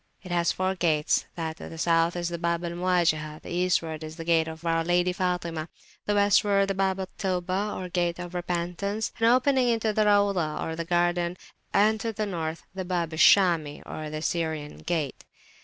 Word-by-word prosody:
It 185 - -9
has 170 -1 +2
four 185 0 -1
gates: 160 -5 +1
that 160 -1 -4
to - - -9
the 165 - -9
South 165 +1 +2
is 175 -1 -2
the 170 -1 -4
Bab 170 0 -1
al 170 - -3
Muwajihah; 170 -4 0
Eastward 170 -3 0
is 155 0 -7
the 165 - -6
gate 165 -1 +3
of 160 +1 -8
our 165 0 +1
Lady 175 +1 +2
Fatimah; 170 -3 -2 0.4
westward 200 -1 +3
the - - +1
Bab 190 0 0
al 190 - -3
Taubah 185 -2 -1
(of 175 0 -7
Repentance), 180 +4 -2
opening 255 +2 +4
into 225 -2 +1
the 215 0 +2
Rauzah 200 -7 +2 0.2
or - - 0
garden; 175 0 +1 0.3
and 215 +2 +3
to 225 +1 -2
the 215 0 -2
North, 165 -4 -4
the 190 0 -4
Bab 175 -3 -2
al 160 - -5
Shami 165 -7 +4
or 155 0 -5
Syrian 160 -3 -2
gate. 160 -6 -3
175 Hz, 175 wpm, -27 LUFS, 165-195 Hz, 0.4 s, opening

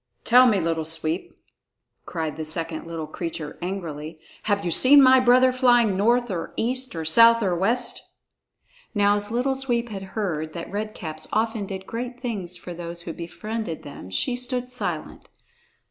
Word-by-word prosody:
"Tell 250 +1 +6
me, 210 -5 +3
Little 165 -1 -1
Sweep," 160 +2 -2 0.8
cried 160 -3 -3
the 160 - -5
second 165 +1 0
little 165 -2 -5
creature 155 -1 -6
angrily, 165 -4 -5 0.3
"have 200 -2 0
you 175 - 0
seen 270 - +7
my 260 -1 +7
brother 255 +1 +5
flying 240 -5 +3
north 235 +4 +2
or 170 -3 -4
east 255 -1 -2
or 160 -1 -4
south 230 +7 +6
or 185 -3 +1
west?" 235 +7 0 0.9
Now 205 0 +4
as 205 0 -2
Little 250 +4 0
Sweep 245 -3 -2
had 195 -1 -8
heard 160 -7 -2
that 170 - -7
Red 215 +1 -4
Caps 155 -2 -7
often 220 -1 -1
did 190 -1 -6
great 245 +3 -5
things 200 -8 -5
for 175 - -8
those 170 0 -7
who 170 -1 -6
befriended 175 +2 -5
them, 140 -10 -10
she 95 - 0
stood 250 0 -3
silent. 250 - -4
200 Hz, 165 wpm, -24 LUFS, 165-240 Hz, 0.9 s, seen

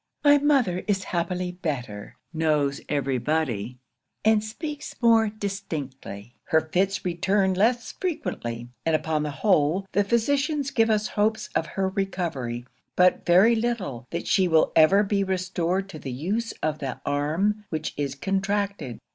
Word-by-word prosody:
'My 290 -1 +6
mother 270 -11 +2
is 195 -2 +1
happily 180 +1 -2
better; 125 - -5 0.2
knows 150 -3 +1
every 135 -3 0
body, 125 -6 -1 0.5
and 220 -1 +4
speaks 295 +7 -6
more 225 -2 +4
distinctly; 145 - -6
her 160 - +3
fits 185 +6 -1
return 190 +2 +1
less 235 +6 +1
frequently; 120 - -4
and 165 -1 +2
upon 155 0 0
the 150 - -2
whole, 165 +2 +2
the 205 - +2
physicians 280 +6 0
give 225 -1 +3
us 215 -1 +1
hopes 215 +1 0
of 160 - 0
her 190 0 +2
recovery, 170 - -3 0.3
but 180 0 +3
very 190 +7 +6
little 205 - -2
that 170 - -4
she 190 -2 +3
will 160 -2 +3
ever 175 +6 +6
be 200 -1 +1
restored 185 0 -1
to 155 - -8
the 135 - -6
use 200 - -2
of 155 -1 -1
the 135 -3 -4
arm 165 +9 0
which 155 -1 -3
is 140 -2 -3
contracted. 195 - -2
185 Hz, 145 wpm, -25 LUFS, 150-210 Hz, 0.5 s, My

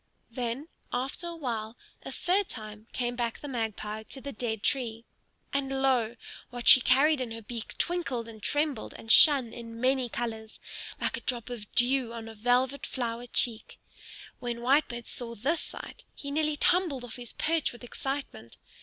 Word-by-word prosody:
Then, 245 +4 -3 0.2
after 265 +7 -2
a 340 - -5
while, 230 -7 -4 0.2
a - - -7
third 380 +2 +1
time 215 -1 -8
came 245 -1 -2
back 235 -2 -1
the 290 - -8
Magpie 220 -4 -3
to 270 - -7
the 280 +1 -6
dead 220 -2 -3
tree. 230 -4 0 0.5
And 270 -1 0
lo, 240 -4 +2 0.3
what 245 -1 -6
she 255 - +11
carried 280 +3 +4
in 250 - -2
her 225 0 -7
beak 230 +1 -6
twinkled 275 -10 -1
and 220 -2 -11
trembled 290 -3 -1
and 225 - -2
shone 265 -5 +8
in 230 -1 -8
many 255 0 +2
colors, 220 -2 -4 0.4
like - - 0
a - - -7
drop 245 -1 -1
of 215 -4 -7
dew 250 -1 +3
on 230 -1 -7
a 225 - -8
velvet 250 +5 +1
flower 240 -1 -3
cheek. 230 -1 0 0.6
When 240 -1 -3
Whitebird 245 -2 +2
saw 235 -1 -6
this 295 +10 0
sight, - - -8
he 280 - -6
nearly 305 0 +1
tumbled 340 -6 +3
off 235 - -7
his 240 -2 -6
perch 325 -1 +1
with 240 0 -13
excitement. 270 - -5
245 Hz, 170 wpm, -29 LUFS, 230-275 Hz, 0.6 s, she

